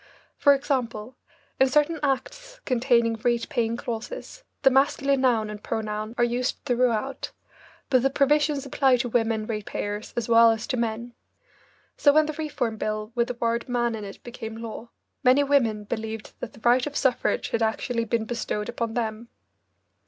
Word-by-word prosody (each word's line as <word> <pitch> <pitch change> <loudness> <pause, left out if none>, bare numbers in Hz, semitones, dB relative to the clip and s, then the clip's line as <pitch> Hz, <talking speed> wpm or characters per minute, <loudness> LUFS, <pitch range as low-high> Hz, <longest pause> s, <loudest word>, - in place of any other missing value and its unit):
For 285 0 +5
example, 250 -4 -2 0.4
in 265 0 +5
certain 300 +4 +2
acts - - -3
containing 235 -3 +2
rate 240 -1 +1
paying 230 0 0
clauses, 245 - -6 0.2
the 270 - +6
masculine 275 0 +2
noun 235 -4 +2
and 210 -1 -8
pronoun 215 +1 -3
are 240 - +3
used 245 +2 0
throughout, 250 0 0 0.6
but 255 -2 +5
the 270 - +3
provisions 290 +1 +2
apply 265 -1 +3
to 245 0 -2
women 225 -2 +1
rate 215 -2 -4
payers 205 +1 -4
as 235 - -1
well 230 0 +7
as 225 -1 0
to 280 - -2
men. 235 +1 -2 0.8
So 285 - +5
when 310 +1 +5
the 310 - -3
Reform 290 -7 -3
Bill 215 0 -3
with 235 0 +1
the 250 - -4
word 235 +1 -1
"man" 240 -1 +1
in 220 -2 -5
it 195 -1 -9
became 225 -2 -7
law, 230 0 -7 0.3
many 260 +2 +5
women 240 -7 +2
believed 220 0 -5
that 245 - -6
the 220 - -16
right 245 +4 +3
of 290 - -4
suffrage 260 -3 +1
had 230 - -1
actually 230 +1 0
been 230 0 0
bestowed 220 -2 -3
upon 230 -1 -3
them. 230 0 -3
240 Hz, 170 wpm, -25 LUFS, 225-270 Hz, 0.8 s, well